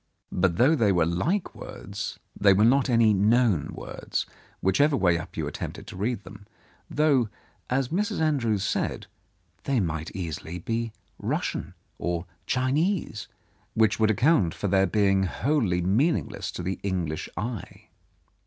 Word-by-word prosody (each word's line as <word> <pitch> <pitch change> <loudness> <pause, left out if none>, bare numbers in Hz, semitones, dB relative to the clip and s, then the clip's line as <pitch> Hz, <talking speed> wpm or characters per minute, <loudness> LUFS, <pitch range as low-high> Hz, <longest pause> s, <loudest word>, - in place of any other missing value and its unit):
But 90 -2 +1
though 135 - +5
they 115 -10 +3
were 85 -3 +3
like 150 - 0
words, 100 +1 -6 0.2
they 100 -1 +5
were 105 +3 +4
not 135 +3 +4
any 115 -3 +5
known 105 - +3
words, - - -4 0.3
whichever 140 +10 +3
way 90 -5 +3
up 80 - -9
you - - -1
attempted - - -6
to - - -9
read 105 +3 -2
them, 100 +2 -12 0.4
though, 140 -7 +3 0.4
as 130 0 +1
Mrs. 210 +5 -1
Andrews 120 -11 +1
said, - - -1 0.6
they 135 -3 +2
might 80 -4 -2
easily 85 -1 -4
be 115 +5 -2 0.3
Russian - - -2 0.2
or 85 0 -2 0.2
Chinese, 135 - 0 0.5
which 110 -1 +3
would 110 -1 +4
account 110 - +3
for 100 - -2
their 95 0 +3
being 95 0 +3
wholly 100 - +1
meaningless 125 - +1
to 90 - -5
the 95 +2 -3
English 90 -6 -2
eye. 110 -2 -5
105 Hz, 145 wpm, -26 LUFS, 95-130 Hz, 0.6 s, though